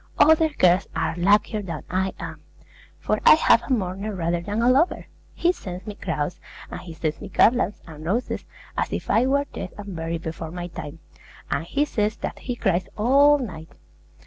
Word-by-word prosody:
Other 320 +1 +5
girls 185 - +3
are 160 - 0
luckier 210 +4 +2
than 170 -6 -6
I 190 +1 0
am; - - -7 0.6
for - - -1
I - - +9
have 240 -7 +4
a - - -11
mourner 200 -2 -1
rather 170 -1 -1
than 205 +5 -2
a - - +4
lover. 275 +8 +3 0.3
He 345 - +3
sends 185 - -8
me 210 - -5
crowns, 170 -4 -3 0.3
and - - -6
he 175 - -10
sends 155 -1 -3
me 205 - -7
garlands 225 +2 +2
and 155 -2 -11
roses, 210 +10 -1 0.3
as - - -1
if - - -3
I 245 +3 +4
were 280 +1 +2
dead 185 - -6
and 200 -3 -7
buried 165 0 -4
before 160 0 -5
my 175 +1 -6
time, 155 -2 -8 0.5
and 160 - -1
he 285 - +1
says 215 -6 -1
that - - -5
he 245 - -4
cries 185 -5 0
all 280 +6 +5
night. 170 - -7
195 Hz, 190 wpm, -24 LUFS, 170-240 Hz, 0.6 s, I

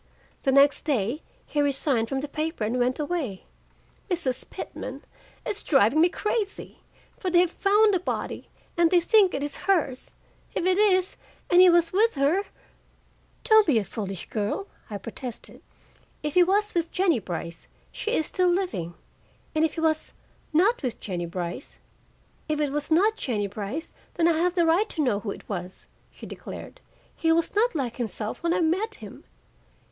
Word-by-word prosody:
The 270 - +1
next 280 +1 +5
day 265 0 0 0.2
he 295 - -1
resigned 270 -5 +1
from 270 0 -1
the 295 - -4
paper 310 -3 -3
and 230 +4 0
went 250 +3 +1
away. 290 - -3 0.6
Mrs. 330 -9 -2
Pitman, - - -7 0.4
it's 420 - -1
driving 275 +1 +4
me 345 - +5
crazy! 420 +1 -3 0.4
For 375 - -1
they 355 - +3
have 360 -1 +1
found 415 +2 +3
a 370 - +2
body, 360 - -4 0.3
and 340 -1 +4
they 360 0 +5
think 390 +1 +4
it 275 - -2
is 290 -1 -4
hers. 285 -9 +1 0.5
If - - -1
it 370 +1 +3
is, 375 -3 +3 0.3
and 355 +1 +7
he 370 - +8
was 340 -1 +3
with 440 +2 +3
her 285 +8 +2 0.5
" - - -36
"Don't 435 -3 +6
be 280 -7 +4
a 215 - +2
foolish 195 -1 -6
girl," 215 - -2 0.2
I 205 - -4
protested. 230 +4 -8 0.6
"If 300 -1 -2
he 360 - +6
was 410 +4 +2
with 335 -1 -1
Jennie 360 -8 +2
Brice, 170 -3 -6 0.2
she 445 - -2
is 315 - +1
still 365 +3 +1
living, 350 - -1 0.6
and 310 - +2
if 320 - +1
he 325 - -3
was 315 -1 0 0.4
not 380 +10 +3
with 250 -4 -3
Jennie 175 -4 -4
Brice 175 +6 -6 0.4
" - - -36
"If 305 -1 0
it 295 -2 0
was 295 0 -2
not 405 +7 +3
Jennie 215 -6 -1
Brice, 205 - -5 0.2
then 335 -2 +3
I 325 -2 +2
have 360 +2 +1
a 340 - +4
right 350 +7 +3
to 310 - -1
know 230 -7 +1
who 205 - -5
it - - -7
was," 180 -2 -6 0.3
she - - -11
declared. - - -9 0.3
"He 325 - +1
was 330 0 +1
not 440 0 +2
like 255 -6 -2
himself 220 -2 -4
when 340 - 0
I 365 - +1
met 375 +7 0
him. 210 -2 -12
315 Hz, 185 wpm, -26 LUFS, 240-360 Hz, 0.6 s, he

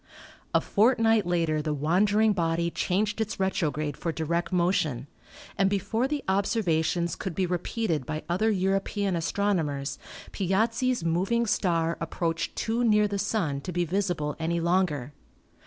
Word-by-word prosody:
A - - +5
fortnight 225 -2 +3
later 165 -3 +1
the 150 0 -2
wandering 205 +8 +3
body 170 -1 0
changed 205 +5 0
its 215 -2 -3
retrograde 155 -6 -1
for 165 - -3
direct 170 +3 -2
motion, 170 -8 +1 0.5
and 195 -1 +4
before 220 +5 0
the 290 0 -3
observations 175 -4 +1
could 190 -4 -5
be 190 - +1
repeated 175 - -2
by 155 0 -4
other 185 +6 +1
European 195 0 0
astronomers 165 -6 -1 0.3
Piazzi's 225 +4 0
moving 195 +8 +1
star 170 -6 +1
approached 165 0 -2
too 230 +2 -1
near 210 -2 +4
the 200 -1 -3
Sun 175 -9 -1
to 180 - -5
be 175 0 0
visible 175 -5 -1
any 170 +1 0
longer. 165 -6 0
180 Hz, 140 wpm, -27 LUFS, 165-205 Hz, 0.5 s, A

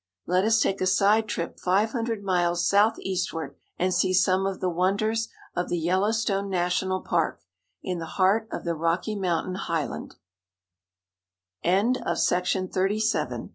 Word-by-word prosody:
Let 185 +3 +2
us 225 0 +4
take 195 -2 0
a 185 - +2
side 205 +4 +3
trip 170 -5 -4
five 200 +5 +2
hundred 230 -4 -2
miles 175 -2 +1
southeastward, 185 -7 0 0.2
and 185 +1 +1
see 185 0 +2
some 190 +1 +3
of 195 -1 -4
the 185 - -1
won 180 +2 +1
ders 225 +1 0 0.3
of 180 - -2
the 175 - 0
Yellowstone 200 +3 0
National 185 +1 0
Park, 165 - -1 0.4
in 180 -2 -3
the 165 - -5
heart 200 +4 +3
of - - -5
the 170 - -1
Rocky 170 +6 -1
Mountain 185 -1 -1
highl 165 -3 -3
185 Hz, 135 wpm, -26 LUFS, 175-205 Hz, 0.4 s, us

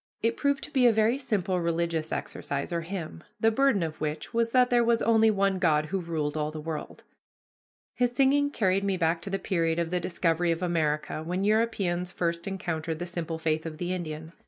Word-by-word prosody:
It 230 +1 +2
proved 280 -1 0
to - - -7
be 260 -3 +4
a - - +6
very 220 +4 +2
simple 190 -8 0
religious 170 -1 -1
exercise 140 +4 -4
or 170 - 0
hymn, 165 - -6 0.2
the 225 - +4
burden 250 -5 +3
of 155 -2 -5
which 155 +6 -3
was 230 0 +2
that 250 +1 +3
there 240 -1 +4
was 230 0 +2
only 225 -1 +5
one 195 -2 +1
God 155 -4 +3
who 190 +5 -2
ruled 155 -3 -2
all 150 -1 -1
the 155 0 -7
world. 155 0 -6 0.9
His 245 -1 +1
singing 275 +3 +3
carried 195 -7 +1
me 195 -1 0
back 165 -1 +1
to 195 - -6
the 195 - 0
period 165 -5 0
of 170 -1 -1
the 180 - +1
discovery 175 -1 0
of 165 +2 -2
America, 155 -3 0
when 180 +4 -2
Europeans 200 -5 +1
first 170 0 -2
encountered 165 -4 -3
the 175 - -4
simple 170 -2 -4
faith 160 -1 0
of 160 -2 -6
the 175 +2 -2
Indian. 160 -2 -5
175 Hz, 205 wpm, -28 LUFS, 160-220 Hz, 0.9 s, a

